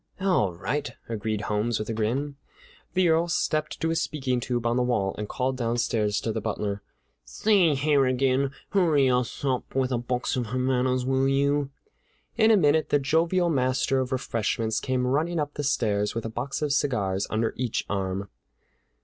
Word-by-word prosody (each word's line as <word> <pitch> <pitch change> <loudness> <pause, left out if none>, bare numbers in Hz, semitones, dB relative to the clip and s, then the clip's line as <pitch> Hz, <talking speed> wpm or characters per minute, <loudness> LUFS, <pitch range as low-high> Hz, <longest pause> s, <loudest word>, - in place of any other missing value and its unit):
"All 180 - +1
right," 100 +12 -2 0.2
agreed 110 -1 -2
Holmes 105 +2 0
with 110 - -4
a 115 - -2
grin. 125 +7 -1 0.6
The 185 -1 +4
Earl 165 +1 +3
stepped 155 -2 -1
to 165 +1 +1
a - - 0
speaking 140 -6 -1
tube 120 0 -2
on 120 0 +2
the 125 - +2
wall 110 -6 0
and 105 -1 -5
called 130 0 -1
downstairs 115 -3 0
to 115 - -2
the 110 - -3
butler: 100 0 -3 0.4
"Say, 175 - +2
Harrigan, 135 -1 +2 0.2
hurry 155 -9 +3
us 125 +2 -1
up 130 -2 0
a 130 -2 +1
box 125 +1 -2
of 125 -3 -2
Havanas, 130 +1 0
will 135 +1 +2
you?" 140 +1 +1 0.7
In 220 0 +4
a 220 - +6
minute 155 -2 +3
the - - +4
jovial 165 +5 +1
master 130 0 +1
of 130 -1 -2
refreshments 115 -3 -1
came 130 -1 -1
running 155 +6 0
up 145 -1 -2
the 145 - -4
stairs 105 -7 0
with 115 - -3
a - - -2
box 125 +6 -4
of 145 -2 +1
cigars 105 -9 0
under 110 +1 0
each 125 -2 -2
arm. 95 0 -2
130 Hz, 175 wpm, -26 LUFS, 115-145 Hz, 0.7 s, a